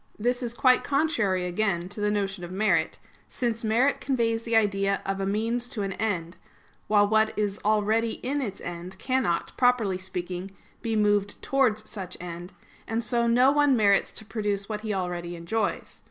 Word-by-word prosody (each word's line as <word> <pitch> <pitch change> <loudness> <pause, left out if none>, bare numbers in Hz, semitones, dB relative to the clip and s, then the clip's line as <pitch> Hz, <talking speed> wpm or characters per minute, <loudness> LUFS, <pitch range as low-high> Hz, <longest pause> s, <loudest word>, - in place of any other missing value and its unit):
This 245 +3 0
is 240 -1 -3
quite 255 +1 +4
contrary, 235 - +1
again, 180 -1 -1
to 205 +1 -7
the 210 - +2
notion 195 -3 -2
of 175 - -7
merit: 205 +4 +1 0.3
since 235 -2 -2
merit 235 +6 +2
conveys 230 -4 0
the 230 0 -1
idea 200 -2 +2
of 195 0 -2
a 195 - -1
means 230 +4 -1
to 220 -6 -3
an 195 -1 -2
end; 185 -6 -2 0.5
while 205 -1 +4
what 220 +1 +2
is 205 -1 -1
already 215 +2 +2
in 285 +3 0
its 215 -7 -4
end 175 +2 -7
cannot, 255 -8 -1
properly 235 -7 +2
speaking, 185 0 -5 0.3
be 225 -2 -1
moved 205 -1 +2
towards 225 -6 +1
such 185 -3 -6
end; 175 +1 -7 0.4
and 225 +1 -1
so 235 +1 +1
no 250 +3 +5
one 290 -3 +4
merits 200 -2 +3
to 220 - -9
produce 205 -2 -2
what 215 -1 -4
he 215 -1 -3
already 175 -2 -3
enjoys. 185 +6 -3
210 Hz, 175 wpm, -26 LUFS, 195-230 Hz, 0.5 s, no